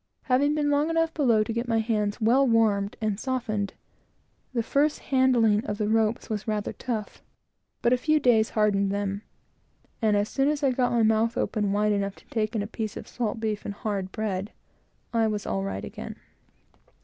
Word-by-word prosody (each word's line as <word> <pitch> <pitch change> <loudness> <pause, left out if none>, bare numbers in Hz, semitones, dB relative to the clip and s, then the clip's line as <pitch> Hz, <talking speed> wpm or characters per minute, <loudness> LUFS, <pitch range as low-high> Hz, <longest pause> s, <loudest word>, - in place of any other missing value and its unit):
Having 280 +3 +2
been 295 -1 +1
long 290 +2 +2
enough 330 0 +1
below 235 -8 +3
to 225 - -4
get 235 +2 -2
my 225 -1 +1
hands 215 -2 0
well 250 +5 +4
warmed 210 -4 +2
and 215 -2 -1
softened, 225 -6 -2 0.8
the 235 -3 -1
first 290 +6 +2
handling 240 -5 +3
of 205 - -2
the 210 -1 -1
ropes 220 +1 +1
was 215 -1 -4
rather 210 -1 -2
tough; 225 -5 -5 0.6
but 240 - +4
a - - +4
few 310 +4 +2
days 225 -5 +3
hardened 200 -2 +2
them, 200 0 -2 0.8
and 215 -2 +3
as 205 +1 +1
soon 270 +3 +1
as 300 -1 -1
I 270 - +4
got 250 0 +1
my 235 -1 +3
mouth 220 +1 +2
open 210 -3 0
wide 210 +1 +2
enough 200 -1 -1
to - - -20
take 220 0 -1
in 210 - 0
a - - -4
piece 215 -1 -5
of - - -8
salt 225 -2 -3
beef 215 -2 -2
and 200 - -5
hard 200 -3 -3
bread, 210 -1 -3 0.6
I 225 -1 +3
was 210 -2 -2
all 95 0 -1
right 95 +1 -4
again. - - -7
220 Hz, 195 wpm, -26 LUFS, 205-245 Hz, 0.8 s, well